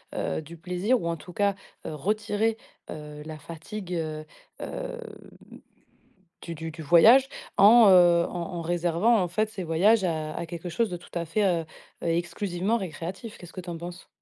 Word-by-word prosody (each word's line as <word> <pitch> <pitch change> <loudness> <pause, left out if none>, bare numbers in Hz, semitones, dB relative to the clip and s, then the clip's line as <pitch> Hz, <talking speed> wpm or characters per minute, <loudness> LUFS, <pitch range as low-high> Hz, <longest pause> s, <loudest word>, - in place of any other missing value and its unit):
heu, - - -2
du 160 +2 -11
plaisir 180 +8 0
ou 170 - -3
en 165 - -2
tout 180 +3 -12
cas, 200 0 +1 0.3
heu, - - -4
retirer, 210 +5 0 0.3
heu, 150 -1 -8
la 155 -1 -7
fatigue, 180 +4 -7
heu 155 -1 -4 0.4
heu, 485 - -5 1.4
du 170 - -5
du 165 +1 -6
du 160 +1 -9
voyage 225 - +7 0.3
en, 220 +2 +8
heu, 175 -2 +6
en 175 0 -5
en - - -3
réservant 175 +6 +2
en 180 - 0
fait 215 +5 0
ces 195 -4 -6
voyages 190 +6 +3
à 155 -3 -2
à 170 - -3
quelque 170 +1 -6
chose 225 +5 0
de 175 - -4
tout 175 - -16
à 170 - -1
fait, 205 +6 0
heu 170 -3 +1 0.4
heu, - - -1
exclusivement 175 +5 -1
récréatif. 190 - -6
Qu'est-ce 175 -1 -12
que 185 - -6
tu 180 - -9
en 170 - -4
penses? 175 +2 -9
175 Hz, 185 wpm, -27 LUFS, 165-205 Hz, 1.4 s, en